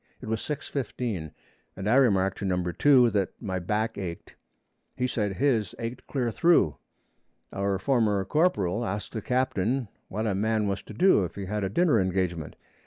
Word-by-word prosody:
It - - -9
was 110 0 -1
6:15 125 - -3 0.5
and 95 +1 -5
I 110 - +3
remarked 100 -8 +3
to 100 - -3
Number 90 -2 -1
2 130 -5 +5
that 100 -3 -1
my 95 -2 -3
back 105 +5 -1
ached. 85 -3 -6 0.6
He 125 - 0
said 105 -5 -1
his 115 -4 +1
ached 115 +2 -6
clear 125 -4 -1
through. 165 - +3 0.8
Our 100 0 0
former 105 -3 +1
corporal 120 - +1
asked 105 -1 -4
the 110 - -3
captain 125 -1 0 0.2
what 110 +3 -3
a 105 - +1
man 110 +2 +1
was 100 0 -2
to - - -11
do 180 - +5
if 90 - -5
he 100 - -5
had 105 +2 -2
a 95 - 0
dinner 125 - +3
engagement. 90 -4 -2
105 Hz, 175 wpm, -27 LUFS, 95-125 Hz, 0.8 s, 2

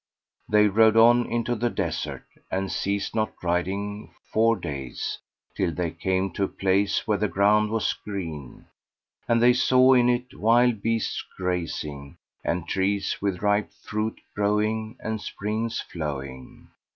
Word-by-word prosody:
They 105 0 +5
rode 110 +2 +4
on 120 +1 +6
into 120 +1 0
the 120 +1 0
desert - - -3 0.2
and 95 0 -2
ceased 100 0 -2
not 110 -1 -1
riding 100 +4 -2 0.2
four 115 +1 +4
days, 70 - -5 0.4
till 95 -3 0
they 85 0 -2
came 95 +3 -1
to 100 - -2
a - - -3
place 95 +2 +1
where 105 -2 +1
the 105 - +1
ground 105 +2 +3
was 110 0 0
green, 80 -10 -7 0.6
and 115 0 +3
they 125 0 +7
saw 130 +1 +5
in 125 -1 +4
it 125 +1 -1
wild 115 0 +3
beasts 115 0 -1
grazing 75 -6 -4 0.3
and 85 0 -2
trees 100 +1 -1
with 100 -1 -2
ripe 105 0 +1
fruit 105 +1 -4
growing 110 +3 0
and 110 -1 -3
springs 110 +3 -3
flowing. 70 -5 -7
105 Hz, 140 wpm, -25 LUFS, 95-110 Hz, 0.6 s, they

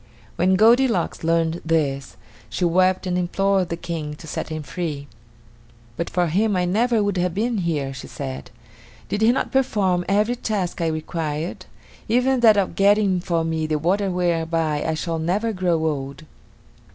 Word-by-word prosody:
When 185 +1 +3
Goldilocks 230 -3 +3
learned 165 0 +1
this, 145 -4 -1 0.3
she 115 +11 -1
wept 185 +2 +2
and 180 -1 0
implored 190 +1 +1
the 170 - -3
King 165 -3 -5
to 165 - -13
set 160 - -5
him 155 -1 -4
free. 145 0 -4 0.9
"But 170 - -3
for 180 -1 +1
him 200 +6 +1
I 180 -1 +1
never 220 +4 +2
would 205 -2 -1
have 180 -1 0
been 225 +1 0
here," 150 -6 -1
she 135 - -8
said. 65 +1 -6 0.6
"Did 205 - -2
he 225 +2 +5
not 255 - -1
perform 205 -9 +1
every 210 +5 +2
task 195 -7 -2
I 165 - +1
required, 155 0 -3 0.4
even 250 +3 +2
that 220 -3 +6
of 195 -2 +1
getting 200 -2 +3
for 170 -2 -1
me 160 -1 -1
the 155 -1 0
water 190 +6 +1
whereby 165 -4 0
I 160 - -1
shall 165 0 -3
never 200 +8 0
grow 180 -3 +1
old?" 140 -1 -3
175 Hz, 165 wpm, -22 LUFS, 160-200 Hz, 0.9 s, that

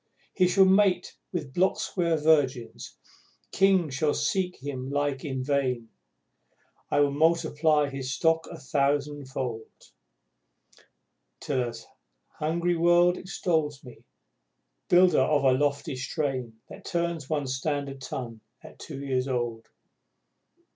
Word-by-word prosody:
He 185 -2 +3
shall 190 +2 +5
mate 190 -1 +3 0.2
with 150 -7 -4
block 190 +2 +2
square 170 -3 0
virgins 145 -6 0 0.5
kings 190 -7 +3
shall 145 +3 +1
seek 185 -2 -1
his 145 +1 -6 0.2
like 145 -1 -1
in 130 -3 -3
vain, 130 -4 -1 1.0
While 145 0 +4
I - - 0
multiply 155 -1 +2
his 135 -2 -5
stock 165 +3 +1
a 170 - -9
thousandfold, 140 -5 -2 1.7
Till 135 -3 -1
an 120 - -6 0.7
hungry 170 +3 0
world 175 +1 +4
extol 170 -5 -1
me, 125 -3 -13 0.9
builder 180 -4 +5
of 145 +1 +2
a 135 - +5
lofty 140 +1 0
strain 130 -4 -3
That - - -12
turns 170 -4 -2
one 150 -3 -1
standard 135 +1 -3
ton 115 -4 -6 0.2
at - - -14
two 140 -3 -8
years 130 -1 0
old. 120 -3 -3
145 Hz, 120 wpm, -27 LUFS, 130-170 Hz, 1.7 s, shall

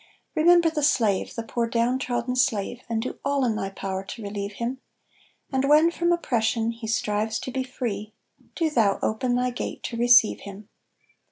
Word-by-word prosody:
Remember 340 +1 +5
the 305 -2 -2
slave, 220 -9 +1
the 230 - -3
poor 235 +1 -2
down 235 +2 +1
trodden 250 -1 -2
slave, 245 -2 0
And 225 -1 -1
do 255 - -6
all 280 -1 +1
in 225 -3 0
thy 195 -2 -3
power 195 -1 -4
to 215 +3 -8
relieve 200 0 -4
him; 240 +5 -4 0.7
And 270 0 +1
when 310 +3 +6
from 345 0 0
oppression 230 -8 0
he 230 -1 -8
strives 215 0 0
to 255 - -5
be 260 +1 -2
free, 225 -5 -4 0.4
Do 325 -3 0
thou 215 -8 +3
open 245 +3 0
thy 250 0 0
gate 245 - -5
to 235 - -4
receive 240 -1 +5
him. 200 +1 -11
235 Hz, 180 wpm, -25 LUFS, 220-260 Hz, 0.7 s, when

